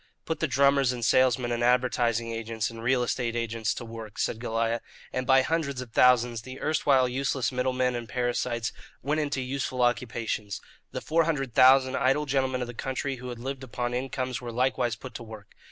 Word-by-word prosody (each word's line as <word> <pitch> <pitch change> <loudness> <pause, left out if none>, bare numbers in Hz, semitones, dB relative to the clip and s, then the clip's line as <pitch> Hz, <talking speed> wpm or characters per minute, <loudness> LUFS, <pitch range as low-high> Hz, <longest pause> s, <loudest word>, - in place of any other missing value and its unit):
"Put 160 - -2
the 155 - +1
drummers, 140 0 +3
and 120 -2 -3
salesmen, 125 0 +3
and 120 0 -1
advertising 120 -2 +2
agents, 115 0 -3
and 115 0 -9
real 125 +1 +2
estate 120 -1 -1
agents 115 -2 -1
to 120 - -6
work," 115 -2 -9
said 110 - -1
Goliah; 115 0 -1 0.3
and 130 0 -2
by 135 0 +6
hundreds 145 -4 -1
of 125 -3 -7
thousands 120 -1 +4
the 130 +2 -9
erstwhile 140 -4 +3
useless 130 0 -1
middlemen 125 0 0
and 120 -1 -5
parasites 120 -2 -1 0.3
went 150 +4 0
into 145 -3 -2
useful 130 -1 -2
occupations. 115 -3 -1 0.3
The - - -4
four 165 +1 +2
hundred 135 -7 -1
thousand 130 +1 +6
idle 135 +4 +2
gentlemen 130 -2 0
of 125 - -2
the 120 - -7
country 130 +2 -3
who 125 +1 -7
had 120 - -6
lived 135 +2 -5
upon 120 -1 -3
incomes 130 0 -3
were 120 -1 -5
likewise 125 0 0
put 130 -2 -10
to 115 - -7
work. 110 -3 -11
125 Hz, 190 wpm, -27 LUFS, 115-130 Hz, 0.3 s, by